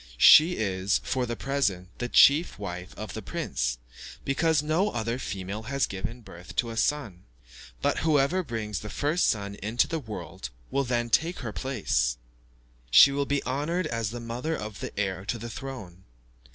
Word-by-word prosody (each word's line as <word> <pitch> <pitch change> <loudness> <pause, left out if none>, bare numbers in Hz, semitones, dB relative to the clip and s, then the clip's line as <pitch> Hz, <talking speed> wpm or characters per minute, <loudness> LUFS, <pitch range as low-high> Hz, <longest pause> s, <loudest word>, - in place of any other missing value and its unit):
She 160 - +8
is, 95 -2 0
for 125 -1 -1
the 120 - -3
present, 105 -10 -1
the 120 - -2
chief 150 +8 +5
wife 90 -3 -6
of 110 +1 -6
the 110 - -5
prince, - - -2 0.5
because 150 +2 +2
no 165 +7 +1
other 115 - -2
female 95 -1 -5
has 140 -1 +1
given 110 +6 -6
birth 90 -5 -12
to 115 -2 0
a - - -6
son; 115 -8 -1 0.6
but - - +2
whoever 155 +3 +2
brings 110 - -4
the 105 - -7
first 150 +9 +1
son 100 -2 -1
into 110 +4 +1
the 165 - -2
world 105 - -7 0.2
will 140 0 +1
then 120 -1 -1
take 165 +9 +1
her 115 -5 -5
place: - - 0 0.7
she 140 - +8
will 140 0 -1
be 145 0 0
honoured 150 +7 -1
as 115 -7 -2
the 120 +2 -6
mother 120 +7 -3
of 105 -1 -7
the - - -6
heir 95 -2 -1
to 120 - -2
the 115 +1 -7
throne. 105 -10 -8
115 Hz, 175 wpm, -27 LUFS, 100-140 Hz, 0.7 s, She